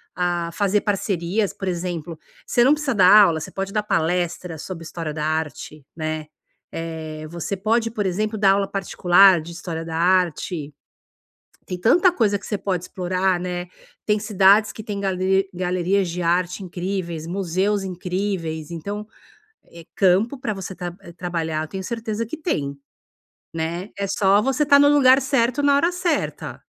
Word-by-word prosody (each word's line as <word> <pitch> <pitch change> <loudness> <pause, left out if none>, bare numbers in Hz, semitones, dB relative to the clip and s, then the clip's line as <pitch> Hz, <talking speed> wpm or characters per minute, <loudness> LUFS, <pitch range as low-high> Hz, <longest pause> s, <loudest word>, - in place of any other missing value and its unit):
ah, 175 -1 -1
fazer 205 +1 +1
parcerias, 195 0 -1
por 195 - -6
exemplo. 175 -2 -4 0.3
Você 240 - +3
não 265 - +5
precisa 300 -4 -1
dar 185 -2 +6 0.2
aula, 160 -2 0
você - - -7
pode 195 0 -4
dar 210 -1 0
palestra 175 -2 -1
sobre 165 +2 -7
história 165 -2 -5
da 150 0 -4
arte, 155 -2 -4
né. 155 -1 -4 0.4
Eh, 160 -1 -6
você 170 +3 -4
pode, 225 +3 +1
por 210 -2 -2
exemplo, 210 +4 -1
dar 200 -2 +5
aula 195 0 +1
particular 190 -2 +4
de 165 +2 -9
história 165 -1 -5
da 165 -1 -5
arte. 175 -3 0 0.9
Tem 180 - -5
tanta 345 - +4
coisa 215 - +1
que - - -16
você 210 - -1
pode 185 -3 -2
explorar, 185 0 0
né, 180 0 -4 0.4
tem 210 0 +2
cidades 205 0 +4
que 215 - -9
têm 205 -1 -5
gale 190 0 +1
galerias 180 +1 0
de 175 +2 -4
arte 175 +3 0
incríveis, 175 -3 -4
museus 190 +3 -1
incríveis. 180 -3 -3
Então, 200 +6 -5 0.6
eh, 170 0 -13
campo 200 +8 +2
para 220 -4 -2
você 190 0 -6
tra 175 -1 -5 0.3
trabalhar 165 -3 -2
eu - - -6
tenho 190 +4 -6
certeza 230 +1 -3
que 275 +8 -7
tem, 145 - -2 0.8
né. 165 +4 -3
É 200 - -2
só 200 +1 +3
você 270 +4 0
estar 280 -1 +6
no 285 0 +6
lugar 265 -2 +6
certo 265 0 +1
na 285 0 +4
hora 335 +5 +3
certa. 350 -3 -2
185 Hz, 165 wpm, -22 LUFS, 170-210 Hz, 0.9 s, dar